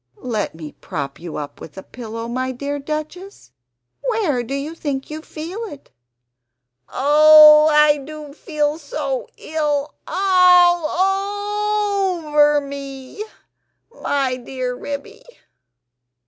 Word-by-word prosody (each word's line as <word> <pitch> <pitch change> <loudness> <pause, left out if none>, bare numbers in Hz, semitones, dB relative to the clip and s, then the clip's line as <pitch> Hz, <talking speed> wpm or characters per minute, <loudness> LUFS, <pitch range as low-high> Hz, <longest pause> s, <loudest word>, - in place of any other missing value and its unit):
"Let 220 -9 -3
me 155 -2 -9
prop 140 -2 -6
you 170 -1 -7
up 145 -1 -7
with 160 - -11
a 190 - -7
pillow, 230 -1 -7
my 255 +2 -2
dear 280 +3 -4
Duchess; 310 - -7 0.5
where 430 - 0
do 240 +4 -5
you 285 +3 -4
think 285 -4 -5
you 310 +1 -6
feel 330 +6 -8
it?" 290 -10 -12 1.0
"Oh 305 +2 +7
I 300 -1 +5
do 295 +1 -10
feel 300 0 -2
so 285 -3 -4
ill 300 -2 -2
ALL 390 +2 +2
OVER 295 -1 +3
me, 275 +5 -8 0.7
my 275 - -1
dear 255 0 -5
Ribby." 285 - -7
295 Hz, 110 wpm, -20 LUFS, 270-350 Hz, 1.0 s, Oh